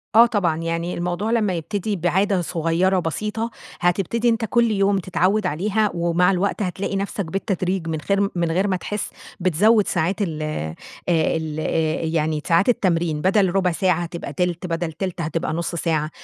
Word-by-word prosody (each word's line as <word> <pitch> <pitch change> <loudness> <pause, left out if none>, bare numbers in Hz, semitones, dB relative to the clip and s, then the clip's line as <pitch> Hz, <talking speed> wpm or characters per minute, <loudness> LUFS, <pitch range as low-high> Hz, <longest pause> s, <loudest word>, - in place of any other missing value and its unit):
آه 230 +1 +9
طبعًا، 195 -9 +1
يعني 165 +1 -2
الموضوع 180 +5 -2
لما 215 -5 +2
يبتدي 200 +5 -2
بعادة 190 +2 +1
صغيرة 175 +3 +1
بسيطة، 210 +7 -2 0.3
هتبتدي 195 +7 +1
أنتَ 225 0 +1
كل 235 +1 +2
يوم 200 -1 +2
تتعود 190 +3 +1
عليها 205 +6 +1
ومع 170 +2 +2
الوقت 195 +3 0
هتلاقي 190 +1 -2
نفسَك 200 0 -2
بالتدريج 185 0 -2
من 160 -1 -2
خير 200 +3 +1
من 170 -2 0
غير 190 +5 +1
ما 190 - +1
تحس، 205 +3 -4 0.3
بتزوِّد 200 +5 +3
ساعات 185 +6 0
ال 160 -6 -2
آآ 80 - -3 0.3
ال 160 -2 0
آآ، 160 0 0
يعني 160 -1 0
ساعات 170 +5 +3
التمرين، 170 -8 +1
بدَل 190 0 +3
رُبع 185 -2 +3
ساعة 180 0 +1
هتبقى 170 0 -6
تِلت، 180 -1 -1
بدل 165 -1 -2
تِلت 185 0 -4
هتبقى 165 +1 -2
نُص 170 +1 -3
ساعة، 155 -2 0
180 Hz, 165 wpm, -22 LUFS, 165-200 Hz, 0.3 s, آه